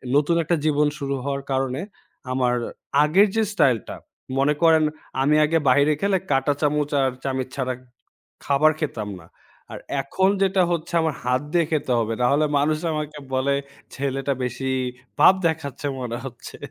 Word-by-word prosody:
নতুন 150 +4 +3
একটা 170 +2 +1
জীবন 150 -1 +3
শুরু 140 -1 -2
হওয়ার 140 0 -3
কারণে, 135 +1 -1 0.5
আমার 125 -1 +1 0.5
আগের 185 +8 +5
যে 225 - +3
স্টাইলটা, 125 - +1 0.4
মনে 140 +2 +3
করেন 160 -2 +5 0.4
আমি 145 +3 +3
আগে 165 +2 +2
বাইরে 145 +4 +4
খেলে, 200 -1 +2
কাঁটা 135 +1 +2
চামচ 150 -1 +1
আর 135 -1 +2
চামিচ 130 -1 -2
ছাড়া 130 -2 -1 0.7
খাবার 145 +2 +4
খেতাম 115 -9 -3
না। 80 - -17 0.4
আর - - -7 0.2
এখন 190 +8 +1
যেটা 190 0 +2
হচ্ছে, 170 0 -3
আমার 160 -3 -1
হাত 125 +1 +1
দিয়ে 170 -2 +3
খেতে 150 -4 0
হবে। 115 0 -1
নাহলে 140 +5 +3
মানুষরা 155 +3 0
আমাকে 150 0 -5 0.2
বলে, 135 +2 +1 0.4
"ছেলেটা 135 0 -1
বেশি 130 +2 -3 0.5
ভাব - - +8
দেখাচ্ছে 150 -3 -3
মনে 120 -1 -3
হচ্ছে।" 130 - -9
140 Hz, 155 wpm, -23 LUFS, 130-155 Hz, 0.7 s, ভাব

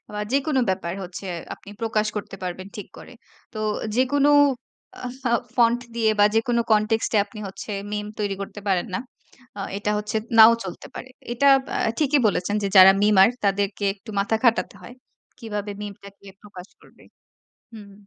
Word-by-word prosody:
বা 210 - -3
যেকোনো 275 0 +1
ব্যাপার 185 -2 -2
হচ্ছে 180 +1 -8 0.3
আপনি 200 - -15
প্রকাশ 215 -1 0
করতে 200 -1 -6
পারবেন 185 +1 -5
ঠিক 205 - -7
করে। - - -13 0.4
তো - - -6 0.4
যেকোনো 280 +3 +3 0.7
আ - - -3 0.2
ফাও 235 -2 +2 0.2
ফন্ট 240 0 +3
দিয়ে 225 -2 +2
বা 205 - +6
যেকোনো 235 +1 +1
কন্টেক্সট 215 +1 +1
এ - - +5
আপনি 210 +1 -13
হচ্ছে 195 +2 -9 0.2
মিম 210 0 -3
তৈরি 205 -2 -1
করতে 205 +1 -8
পারেন 185 -2 +1
না। - - -1 0.6
আ - - -4 0.2
এটা 210 +1 -2
হচ্ছে 210 +1 -4 0.2
নাও 220 +1 +10
চলতে 185 - -8
পারে। 255 - -8 0.2
এটা 260 +4 +1 0.2
বা - - -6 0.2
ঠিকই 295 -1 +2
বলেছেন 205 0 -1
যে - - 0
যারা 190 0 +10
মিমার 205 -1 +6 0.2
তাদেরকে 200 0 0
একটু 215 +2 -13
মাথা 200 +3 +1
খাটাতে 235 -2 +2
হয়, 245 - -11 0.4
কীভাবে 210 -3 -5
মিমটাকে 200 -1 -11 0.2
প্রকাশ 195 -2 -12
করবে - - -21 0.7
হুম। 205 -2 -12
210 Hz, 165 wpm, -23 LUFS, 195-230 Hz, 0.7 s, নাও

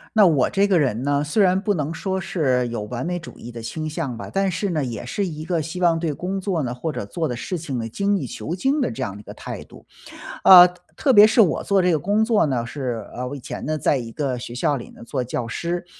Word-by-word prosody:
那 210 -3 +7
我 145 -7 +3
这 200 0 +3
个 195 -3 +2
人 125 -3 0
呢， 145 0 +1
虽 150 +9 0
然 190 -1 +4
不 205 +1 0
能 155 -3 -2
说 190 +2 -2
是 135 -9 0
有 115 -2 -4
完 120 +6 -5
美 180 0 -1
主 170 - -12
义 120 - -9
的 115 -1 -8
倾 155 +7 -4
向 150 -6 -4
吧。 - - -7
但 195 0 +1
是 185 +3 -2
呢 155 -5 0
也 120 -1 -5
是 200 +11 -2
一 155 -4 -5
个 170 -1 -1
希 165 +4 -6
望 165 -2 +3
对 165 -2 -1
工 185 +6 -3
作 180 -6 -1
呢， 120 -1 -3
或 125 +6 -3
者 100 - -5
做 160 +9 -2
的 125 - -3
事 180 +9 -4
情 150 -6 -4
呢， 115 -1 -3
精 200 - 0
益 140 - -4
求 120 +9 -5
精 270 +10 +1
的 - - 0
这 115 - -3
样 100 0 -6
一 - - -11
个 - - -10
态 - - -7
度。 - - -16 0.6
呃， 180 -1 +10 0.3
特 270 - +3
别 210 -2 +9
是 220 +2 +2
我 190 -8 +4
做 200 -1 +2
这 180 0 +3
个 - - +3
工 205 +8 +1
作 220 -6 +3
呢， 125 -5 -1
是， 120 -4 -4
呃， 125 - -3
我 125 - -5
以 - - -10
前 - - -7
呢， 155 +2 -1
在 150 - +2
一 120 -4 -4
个 135 0 -2
学 120 0 -7
校 135 +4 +1
里 120 - -7
呢 - - -16
做 130 +1 -2
教 120 -1 -3
师。 170 +9 -3
155 Hz, 295 characters per minute, -22 LUFS, 125-185 Hz, 0.6 s, 呃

